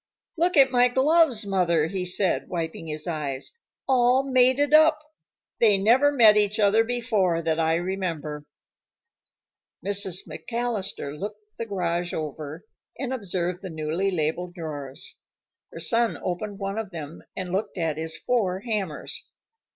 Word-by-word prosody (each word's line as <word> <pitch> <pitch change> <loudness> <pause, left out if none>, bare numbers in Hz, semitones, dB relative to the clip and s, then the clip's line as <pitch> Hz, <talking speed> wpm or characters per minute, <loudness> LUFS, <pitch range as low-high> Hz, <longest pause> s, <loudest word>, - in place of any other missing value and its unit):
"Look 345 0 +1
at 270 -2 +6
my 245 -1 +5
gloves, 265 -2 +3
Mother," 175 -5 +2
he 180 +2 -3
said, 180 +1 +1
wiping 165 -2 -4
his 155 0 -4
eyes. 145 -6 -4 0.4
"All 255 0 +4
mated 260 +2 +3
up. 310 0 +7 0.6
They 210 -4 +5
never 245 +9 +4
met 225 -6 +6
each 210 +1 +1
other 210 +2 +4
before, 215 -8 0
that 160 0 0
I 160 0 +2
remember." 170 -5 -3 1.4
Mrs. 195 -2 +2
McAllister 230 -11 -3
looked 210 +2 -8
the 230 - -4
garage 175 -3 -2
over, 155 +2 -6 0.3
and 265 0 -3
observed 180 -6 -3
the 190 - -6
newly 160 +4 -1
labeled 175 +1 -2
drawers. 150 -2 -6 0.5
Her - - -8
son 230 -1 +1
opened 200 +3 -3
one 195 +2 -3
of 220 -3 -5
them, 160 -3 -8
and 185 -2 -5
looked 200 +2 -2
at 160 -3 -1
his 160 0 -4
four 195 -7 0
hammers. 205 -8 -3
195 Hz, 140 wpm, -25 LUFS, 165-235 Hz, 1.4 s, up